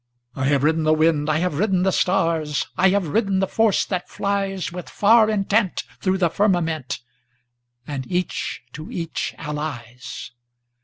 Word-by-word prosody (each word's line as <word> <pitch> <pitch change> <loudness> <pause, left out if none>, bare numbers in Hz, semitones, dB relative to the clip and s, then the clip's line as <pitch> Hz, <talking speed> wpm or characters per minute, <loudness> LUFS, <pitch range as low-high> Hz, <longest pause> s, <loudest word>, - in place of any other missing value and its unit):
I 135 - -1
have 140 0 +2
ridden 160 +2 +3
the 155 0 +3
wind,I 155 -1 +2
have 165 -3 -1
ridden 190 -3 +2
the 190 - +3
stars,I 170 -1 +1
have 190 -4 +1
ridden 200 +2 +1
the 190 - +2
force 220 0 +2
that 180 -2 -3
fliesWith 195 -3 -2
far 220 +1 +5
intent 205 -1 +1 0.2
thro' 190 0 +1
the 175 -4 +2
firmamentAnd 165 - 0 1.1
each 180 -7 -2
to 155 +2 -8
each 165 -2 -3
allies. 130 -5 -6
175 Hz, 135 wpm, -22 LUFS, 155-195 Hz, 1.1 s, far